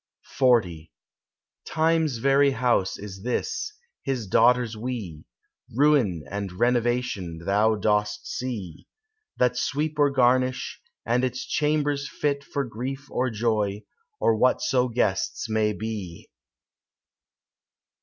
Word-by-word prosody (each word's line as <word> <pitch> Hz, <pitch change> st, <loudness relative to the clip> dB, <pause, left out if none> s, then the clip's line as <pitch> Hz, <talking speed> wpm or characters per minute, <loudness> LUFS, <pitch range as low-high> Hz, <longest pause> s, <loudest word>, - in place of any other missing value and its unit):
XL 125 Hz, -3 st, +6 dB, 1.1 s
"Time's 160 Hz, -4 st, +1 dB
very 140 Hz, +3 st, +4 dB
house 120 Hz, -6 st, +1 dB
is 95 Hz, -2 st, -9 dB
this, 275 Hz, -, -2 dB, 0.3 s
his 130 Hz, -5 st, -2 dB
daughters 120 Hz, +3 st, +3 dB
we, 110 Hz, -9 st, -5 dB, 0.5 s
Ruin 130 Hz, -, +3 dB
and 100 Hz, -1 st, -4 dB
Renovation, 120 Hz, -6 st, 0 dB
thou 105 Hz, +3 st, +3 dB
dost 105 Hz, 0 st, 0 dB
see, 105 Hz, -11 st, -5 dB, 0.5 s
That 125 Hz, -1 st, +2 dB
sweep 150 Hz, +1 st, -1 dB
or 145 Hz, -1 st, +5 dB
garnish, 130 Hz, 0 st, +1 dB, 0.2 s
and 125 Hz, +1 st, +1 dB
its 125 Hz, 0 st, -2 dB
chambers 145 Hz, -1 st, 0 dB
fit 140 Hz, -1 st, -1 dB
For 140 Hz, 0 st, -2 dB
grief 130 Hz, +4 st, -6 dB
or 130 Hz, +1 st, 0 dB
joy, 105 Hz, -3 st, -1 dB, 0.4 s
or 115 Hz, -, +3 dB
whatso 125 Hz, +2 st, +2 dB
guests 115 Hz, -5 st, -1 dB
may 110 Hz, -1 st, +1 dB
be. 105 Hz, -6 st, -6 dB
120 Hz, 105 wpm, -25 LUFS, 105-135 Hz, 1.1 s, XL